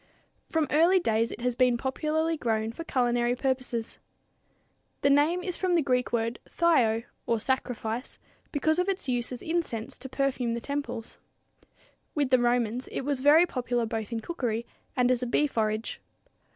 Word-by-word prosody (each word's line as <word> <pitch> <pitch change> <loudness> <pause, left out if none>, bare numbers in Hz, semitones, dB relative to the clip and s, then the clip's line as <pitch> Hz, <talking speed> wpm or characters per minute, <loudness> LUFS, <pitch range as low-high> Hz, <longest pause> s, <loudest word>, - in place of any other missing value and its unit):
From 320 -1 +1
early 335 +5 +5
days 230 -9 +1
it - - -8
has 250 0 +1
been 250 0 +3
popularly 310 +6 0
grown 225 -5 -1
for 330 - -7
culinary 240 -4 +1
purposes. 255 -3 -2 1.0
The 280 - +4
name 310 +6 +3
is 360 -2 -3
from 365 -2 +1
the 330 - +3
Greek 250 -2 +1
word 230 0 -1
thyo, 240 -10 +3 0.2
or 230 -1 +2
sacrifice, 245 -1 -2 0.3
because 315 +3 +1
of 360 +2 +1
its 385 -6 -2
use 245 -1 0
as 250 - -6
incense 320 -10 -2
to 265 - -8
perfume 260 -3 0
the - - -2
temples. 280 -3 -5 1.0
With 285 -3 0
the 255 - +6
Romans 240 0 +1
it - - -2
was 280 0 -1
very 295 +5 +6
popular 245 -6 -1
both 220 -1 -4
in 230 -1 -2
cookery 235 -6 -2 0.3
and 250 0 +3
as 250 -1 +1
a 250 - -1
bee 295 +5 +2
forage. 220 -4 -2
250 Hz, 165 wpm, -28 LUFS, 235-295 Hz, 1.0 s, the